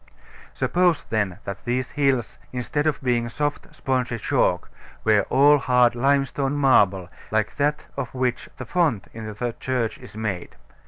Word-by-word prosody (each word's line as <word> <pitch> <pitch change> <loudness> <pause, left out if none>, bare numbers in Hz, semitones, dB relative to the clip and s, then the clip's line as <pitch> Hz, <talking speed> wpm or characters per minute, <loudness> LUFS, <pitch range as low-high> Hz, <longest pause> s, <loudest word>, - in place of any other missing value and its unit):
Suppose, 175 -3 +2
then, 100 -5 -1
that 100 - -6
these 125 +1 -2
hills, 135 -5 0
instead 135 +4 -1
of 155 - 0
being 120 -2 +1
soft, 145 +3 -2
spongy 125 -3 -1
chalk, - - 0 0.3
were 105 -3 +3
all 145 +3 +6
hard 125 -2 +3
limestone 135 +2 +1
marble, 100 -10 +3 0.2
like 110 +1 0
that 150 +1 0
of 125 - -4
which 125 -1 -1
the 130 - -6
font 120 - 0
in 110 -1 -6
the 115 +3 -4
church 125 -4 -2
is - - -12
made. 100 -5 -4
125 Hz, 150 wpm, -24 LUFS, 110-140 Hz, 0.3 s, all